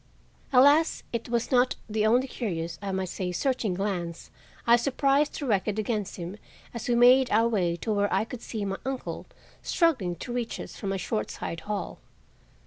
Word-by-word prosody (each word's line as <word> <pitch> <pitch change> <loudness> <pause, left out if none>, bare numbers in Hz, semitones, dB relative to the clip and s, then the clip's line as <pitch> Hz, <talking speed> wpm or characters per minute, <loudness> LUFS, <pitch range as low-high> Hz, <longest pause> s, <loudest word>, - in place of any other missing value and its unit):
Alas! 285 +5 +5
it 235 0 -3
was 235 +2 -1
not 250 0 +3
the 215 -1 +1
only 250 +4 +3
curious, 170 -10 -4
I 200 -1 -3
might 190 0 -1
say 180 0 -3
searching 225 -1 0
glance 180 -4 -3 0.3
I 235 - +7
surprised 275 +3 +2
directed 210 -6 0
against 215 -2 -2
him 180 +3 -6 0.4
as 235 0 -5
we 240 - +3
made 250 +2 +6
our 225 +2 +4
way 180 -7 +1
to 215 +6 -2
where 205 0 +1
I - - +2
could 235 0 -8
see 215 -3 -4
my 195 0 -2
uncle 265 -1 -4 0.3
struggling 260 - +1
to 240 +8 -6
reach 240 -2 -3
us - - -8
from 195 -3 -4
a 195 - -1
short 110 - -2
side 165 - -5
hall. 210 -1 -3
220 Hz, 180 wpm, -27 LUFS, 190-250 Hz, 0.4 s, I